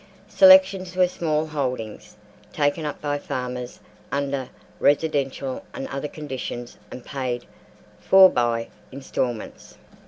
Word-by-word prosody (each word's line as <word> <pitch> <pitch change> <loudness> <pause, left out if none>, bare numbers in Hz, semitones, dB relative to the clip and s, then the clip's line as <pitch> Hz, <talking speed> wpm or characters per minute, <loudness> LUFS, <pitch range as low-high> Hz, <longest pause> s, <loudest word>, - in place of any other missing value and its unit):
Selections 190 -2 +6
were 185 -1 +4
small 160 -3 -1
holdings 125 -8 -5 0.3
taken 145 +1 0
up 150 - -4
by 145 -1 -1
farmers 125 -2 -5 0.3
under 140 -2 -2 0.3
residential 140 -3 0
and - - -5
other 135 +2 -4
conditions 130 -5 -7
and 125 - -10
paid 125 -3 -4 0.5
for 190 0 +7
by 120 -6 0 0.2
instalments. 130 -4 -5
140 Hz, 105 wpm, -23 LUFS, 125-155 Hz, 0.5 s, for